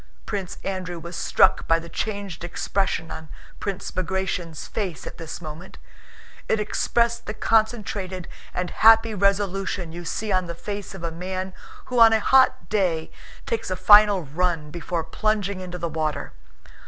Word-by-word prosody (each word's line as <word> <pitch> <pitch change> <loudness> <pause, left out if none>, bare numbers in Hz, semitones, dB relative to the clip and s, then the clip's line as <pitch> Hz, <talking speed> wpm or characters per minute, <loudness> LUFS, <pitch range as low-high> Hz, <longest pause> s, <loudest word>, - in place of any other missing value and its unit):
Prince 195 -4 -4
Andrew 185 -2 -3
was 170 +1 -8
struck - - +3
by 165 - +5
the 165 0 -7
changed 200 -2 -4
expression 175 -1 -1
on 160 -1 -8 0.3
Prince 200 -2 -4
Bagratión's 185 -3 -3
face 185 - -4
at - - -8
this 165 -2 -6
moment. 160 +2 -9 0.7
It 220 - +2
expressed 235 +2 0
the 215 - -4
concentrated 210 -6 0 0.2
and 180 0 -3
happy 225 0 +6
resolution 195 -3 0
you 175 +1 -7
see 215 +5 -3
on 185 -2 +1
the 170 - -5
face 200 +2 -6
of 180 - -9
a 170 - -2
man 185 +2 -4 0.3
who 250 -1 -1
on 225 -1 +8
a 220 - +4
hot 265 +4 +4
day 180 -6 0 0.3
takes 225 -3 -2
a 185 - -1
final 205 0 +7
run 155 0 -1
before 170 0 -3
plunging 200 +3 -1
into 180 -1 -6
the 170 - -2
water. 155 -1 -3
185 Hz, 155 wpm, -24 LUFS, 170-205 Hz, 0.7 s, on